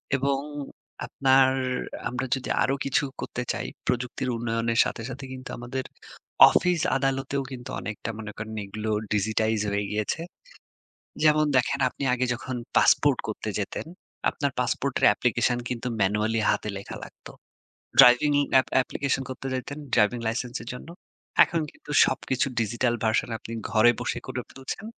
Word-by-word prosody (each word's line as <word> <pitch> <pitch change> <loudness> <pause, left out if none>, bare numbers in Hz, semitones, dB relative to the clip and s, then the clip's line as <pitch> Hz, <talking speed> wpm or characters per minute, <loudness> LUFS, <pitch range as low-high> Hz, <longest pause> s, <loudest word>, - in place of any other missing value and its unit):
এবং 135 0 +1 0.7
আপনার 135 -1 +4 0.6
আমরা 130 +1 -3
যদি 130 - -6
আরো 135 +2 +1
কিছু 140 +1 +2 0.2
করতে 125 - -4
চাই, - - -4 0.2
প্রযুক্তির 125 +1 -1
উন্নয়নের 115 0 -1
সাথে, 115 - -4
সাথে 135 +1 -7
কিন্তু 130 0 -9
আমাদের 125 +2 -4 0.7
অফিস 180 -3 +2 0.2
আদালতেও 135 +1 -1
কিন্তু 125 -1 -7
অনেকটা 110 0 -5
মনে 105 -2 -6
করেন 110 +1 -6
এগুলোর 105 +1 -2
digitize 110 +1 +1
হয়ে 100 0 0
গিয়েছে। 105 +9 -1 1.0
যেমন 155 0 +5
দেখেন 125 - +2
আপনি 140 - -6
আগে 125 0 0
যখন 130 +1 -5 0.2
পাসপোর্ট 145 -3 +5
করতে 110 0 -4
যেতেন, 100 +7 -4 0.4
আপনার 140 -1 -1
পাসপোর্টের 130 +2 +1
application 120 +1 +1
কিন্তু 125 0 -3
manually 105 +3 +1
হাতে 105 - -1
লেখা 100 - -8
লাগত। - - -17 0.7
driving 125 +4 +7 0.3
app - - -7
application 135 0 -2
করতে 130 +1 -6
যাইতেন 135 +3 -4 0.2
ড্রাইভিং 115 +2 +3
লাইসেন্স 120 +3 -2
এর 120 - -10
জন্য। 135 - -10 0.6
এখন 165 -1 -2
কিন্তু - - -15 0.2
সবকিছু 130 +1 -1
digital 120 +2 0
version 110 +2 +1
আপনি 115 - -9 0.2
ঘরে 115 +2 +6
বসে - - -2
করে - - -4
ফেলছেন। 135 +10 -7
125 Hz, 140 wpm, -26 LUFS, 110-135 Hz, 1.0 s, driving